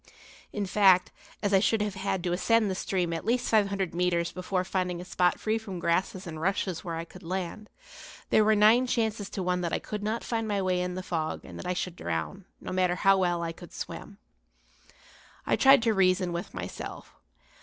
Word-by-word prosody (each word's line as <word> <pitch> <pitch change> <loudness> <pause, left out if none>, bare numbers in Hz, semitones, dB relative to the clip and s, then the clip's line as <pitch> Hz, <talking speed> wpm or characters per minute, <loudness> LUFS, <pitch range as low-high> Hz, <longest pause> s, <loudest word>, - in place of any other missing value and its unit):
In 205 -1 -2
fact, 190 -2 +4 0.3
as 205 -1 +1
I 195 - +6
should 215 +2 +2
have 210 -2 -3
had 190 -1 -2
to 175 -1 0
ascend 215 +3 +2
the - - 0
stream 180 -2 -1
at 165 - -3
least 240 +3 0
five 215 -3 +4
hundred 195 -3 -2
metres 170 -1 0
before 185 0 -2
finding 180 -2 -2
a 180 - -7
spot 180 0 +1
free 220 +1 0
from 195 -4 -7
grasses 180 +3 -1
and 160 -2 -7
rushes 185 -2 -1
where 170 -2 -4
I 165 +1 -4
could 180 +2 -14
land, 190 +4 -5 0.6
there 215 - +5
were 215 +1 +4
nine 220 +5 +5
chances 220 -4 -1
to 190 - -4
one 180 0 0
that 170 -1 -2
I - - +2
could 210 -1 -6
not 220 +3 -2
find 225 -2 -2
my 205 -2 0
way 185 -1 +1
in 180 0 -3
the 185 - -4
fog 160 -3 -3
and - - -9
that - - -6
I 180 - 0
should 180 -1 -3
drown, 80 - -4
no - - -7
matter 185 -1 +1
how 195 +1 +4
well 175 -2 +1
I 165 - -2
could 170 0 -13
swim. - - -7 1.3
I - - +2
tried 270 -3 +6
to 225 -2 +3
reason 185 -2 +2
with 170 +1 -4
myself. 90 -1 -7
185 Hz, 215 wpm, -28 LUFS, 175-210 Hz, 1.3 s, I